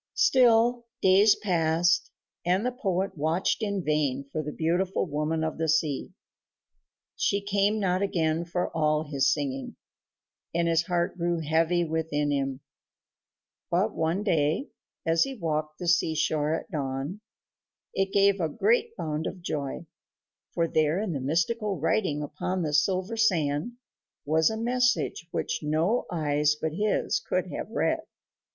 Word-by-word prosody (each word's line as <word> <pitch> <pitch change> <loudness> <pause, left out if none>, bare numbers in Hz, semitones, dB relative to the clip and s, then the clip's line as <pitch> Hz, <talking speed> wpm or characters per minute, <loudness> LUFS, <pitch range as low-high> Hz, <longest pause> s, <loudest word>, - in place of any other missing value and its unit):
Still, 240 - +4 0.2
days 195 +3 +6
passed, 170 -3 +1 0.3
and 185 +5 +1
the 250 - +1
poet 195 -6 -2
watched 160 +8 0
in 200 -3 -1
vain 145 -3 0
for 155 - -2
the 150 0 -5
beautiful 175 +6 0
woman 155 0 -1
of 160 0 -3
the 160 -1 0
sea. 155 -3 +1 1.1
She 200 - +1
came 200 +1 +1
not 185 -2 +1
again 165 -4 0
for 175 0 -3
all 155 -1 +2
his 140 -3 +1
singing, 135 -3 -3 0.8
and 170 0 +2
his 165 0 +2
heart 175 0 -1
grew 170 -1 0
heavy 165 +3 +2
within 155 -2 -1
him; 135 -1 -1 1.1
but - - +1
one 165 +5 -1
day, 165 - +1 0.4
as 165 0 +2
he 270 - -4
walked 155 -5 -2
the 175 - -5
seashore 160 -2 +1
at - - -20
dawn, 140 +5 -3 0.7
it 195 0 0
gave 200 -1 +3
a 160 - 0
great 460 - +1
bound 155 0 -2
of 180 -2 -7
joy, 145 -1 -4 0.7
for 165 -1 0
there 155 +2 +1
in 210 -3 -2
mystical 195 - 0
writing 160 -1 0
upon 170 +5 -3
the 150 -2 -2
silver 185 +8 +1
sand 170 -3 +1 0.5
was 160 +2 +3
a 220 - -3
message 245 -6 0
which - - -2
no 160 +10 0
eyes 150 -2 +1
but 160 -1 -2
his 210 - 0
could - - -2
have - - -5
read. - - 0
165 Hz, 145 wpm, -27 LUFS, 155-195 Hz, 1.1 s, days